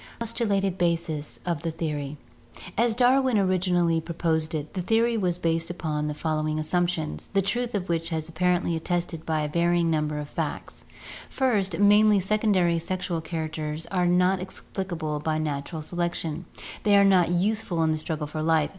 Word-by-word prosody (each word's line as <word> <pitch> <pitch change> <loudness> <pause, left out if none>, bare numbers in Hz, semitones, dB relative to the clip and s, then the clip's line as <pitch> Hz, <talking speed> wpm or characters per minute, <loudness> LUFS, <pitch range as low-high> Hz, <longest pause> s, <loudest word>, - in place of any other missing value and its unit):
Postulated 200 -5 -1
Bases 165 -3 -1
of 170 -4 -1
the 165 - -2
Theory. 150 -3 -4 0.3
— 175 - -13
As 230 -2 0
Darwin 255 0 +4
originally 180 -3 +2
pro 165 +1 -7
posed 160 -1 0
it, 150 -1 -5
the 185 - -2
theory 230 +5 +2
was 180 -5 +1
based 165 -1 0
upon 155 -4 -2
the 150 - -3
following 155 0 -1
assumptions, 165 0 -1
the 195 - +1
truth 240 +4 -1
of 190 -2 -2
which 165 -1 -1
was 160 -1 -2
apparently 175 +1 +1
attested 165 0 -2
by 160 -1 +1
a 150 - -1
varying 170 +1 +2
number 150 -1 0
of 150 0 -4
facts: - - -5 0.4
"First, 215 -7 +1
many 205 0 +5
secondary 190 -4 +2
sexual 175 -1 -3
characters 155 -1 -4
are 180 -2 +2
not 180 +2 +3
explicable 175 -4 -4
by 155 +1 -1
natural 155 +1 -3
selection; 170 -1 -3 0.4
they 205 -1 +4
are 200 0 +6
not 185 -4 +4
useful 180 -1 0
in 160 - +2
the 155 - 0
struggle 155 -1 -3
for 155 +1 -5
life. 160 -1 +2
170 Hz, 170 wpm, -26 LUFS, 155-190 Hz, 0.4 s, are